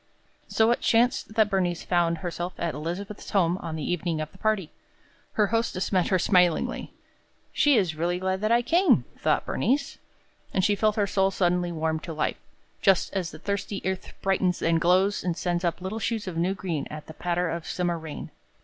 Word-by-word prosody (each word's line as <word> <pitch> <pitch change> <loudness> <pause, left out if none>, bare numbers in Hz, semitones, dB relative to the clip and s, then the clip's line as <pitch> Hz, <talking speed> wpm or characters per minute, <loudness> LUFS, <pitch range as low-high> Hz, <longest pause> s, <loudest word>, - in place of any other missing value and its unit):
So 225 +1 +3
it 240 - +1
chanced 230 -1 +2
that 215 -2 +3
Bernice 180 -3 0
found 170 -2 +1
herself 175 +1 -3
at 170 -2 -2
Elizabeth's 175 +7 -5
home 180 -2 +2
on 165 -2 -5
the 155 - -4
evening 170 -2 -1
of 155 0 -4
the - - -19
party. 215 -7 0 0.6
Her 210 - +3
hostess 225 -5 0
met 185 -3 +2
her 185 - +3
smilingly. 180 -3 +2 0.6
"She 290 -4 +4
is 185 -6 +1
really 170 +3 -1
glad 190 +1 -1
that 215 +1 +1
I 240 +1 +4
came," 350 +8 +4
thought - - +1
Bernice. 280 +3 0 0.6
And 185 - +3
she 205 - +3
felt 210 +1 +2
her 205 - +2
soul 195 -1 +2
suddenly 180 -2 +1
warm 160 -1 -1
to 165 0 -7
life, 155 - -1 0.4
just 195 -3 +3
as 185 -4 -1
the - - -10
thirsty 200 0 -3
earth 190 0 -3
brightens 185 -2 +1
and 165 0 +2
glows 185 +4 +3
and 175 -2 -1
sends 175 -1 -1
up 170 -1 0
little 190 +4 -4
shoots 225 -1 -2
of 185 -3 -5
new 175 +4 0
green 170 -7 -3
at 150 0 -8
a 160 - -9
patter 175 0 -1
of 170 0 -5
summer 175 -2 -1
rain. 160 -2 -7
180 Hz, 195 wpm, -26 LUFS, 170-200 Hz, 0.6 s, She